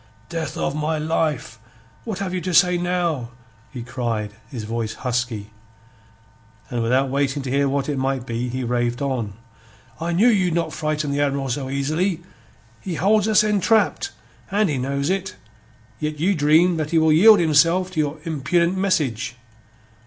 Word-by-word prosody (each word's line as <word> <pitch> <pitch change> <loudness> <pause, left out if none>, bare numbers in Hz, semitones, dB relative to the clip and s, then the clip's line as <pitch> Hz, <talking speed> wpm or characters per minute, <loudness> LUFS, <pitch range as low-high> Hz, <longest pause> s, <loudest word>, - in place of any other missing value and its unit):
"Death 165 -5 -4
of - - -1
my 155 +1 -1
life, 150 -7 -1 0.5
what 220 -5 -4
have 190 -2 -3
you 180 - -2
to 180 0 -2
say 180 +2 +5
now?" 175 -8 -1 0.4
he 125 -3 -6
cried, 115 -4 -3 0.2
his 120 -6 -6
voice 115 0 -3
husky. 120 -4 -3 1.2
And 120 -1 -1
without 130 +4 +2
waiting 140 0 0
to 130 - -4
hear 140 0 +2
what 140 0 -1
it 145 -3 -1
might 135 -1 -1
be, 120 +1 -3
he 130 +1 -3
raved 120 +1 -1
on: 125 -7 -2 0.7
"I 170 +1 -2
knew 200 +8 +4
you 190 -6 +3
not 165 -1 -1
frighten 155 -1 -2
the 140 +1 0
Admiral 140 -1 0
so 130 +1 -3
easy. 155 +6 -1 0.6
He 180 -3 -5
hold 210 +4 +2
us 215 -1 +5
entrap', 210 - +2 0.4
and 205 0 +2
he 140 -3 -1
knows 140 +4 -1
it; 190 -1 -2 0.6
yet 150 0 -3
you 185 +6 +2
dream 160 +2 +4
that 155 -1 -2
he 165 - +1
will 160 -1 +4
yield 205 +6 +7
himself 165 +3 +3
to 170 - -3
your 150 0 0
impudent 170 +3 +1
message. 145 - 0
150 Hz, 165 wpm, -22 LUFS, 130-175 Hz, 1.2 s, yield